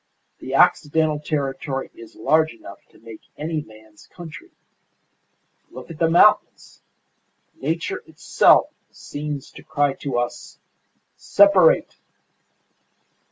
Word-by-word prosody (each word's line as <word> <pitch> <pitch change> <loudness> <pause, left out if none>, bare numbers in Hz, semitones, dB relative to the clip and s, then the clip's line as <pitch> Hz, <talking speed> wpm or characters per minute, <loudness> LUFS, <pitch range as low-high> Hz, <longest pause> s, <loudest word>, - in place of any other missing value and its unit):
The - - -5
Occidental 155 0 +2
territory 135 -2 -4
is 345 -1 -14
large 160 - +1
enough 100 -3 -13
to - - -23
make 115 -1 -13 0.2
any 155 +1 -3
man's 110 -3 -18
country. 175 - -12 1.2
Look - - -11
at 155 - -11
the 165 - +2
mountains! 170 - +2 0.8
Nature 165 +5 -3
itself 160 - +3 0.2
seems 145 -1 -7
to - - -14
cry 145 -1 0
to 135 -4 -3
us, 120 0 -5 0.6
'Separate! 305 +12 +4
150 Hz, 105 wpm, -21 LUFS, 135-165 Hz, 1.2 s, Separate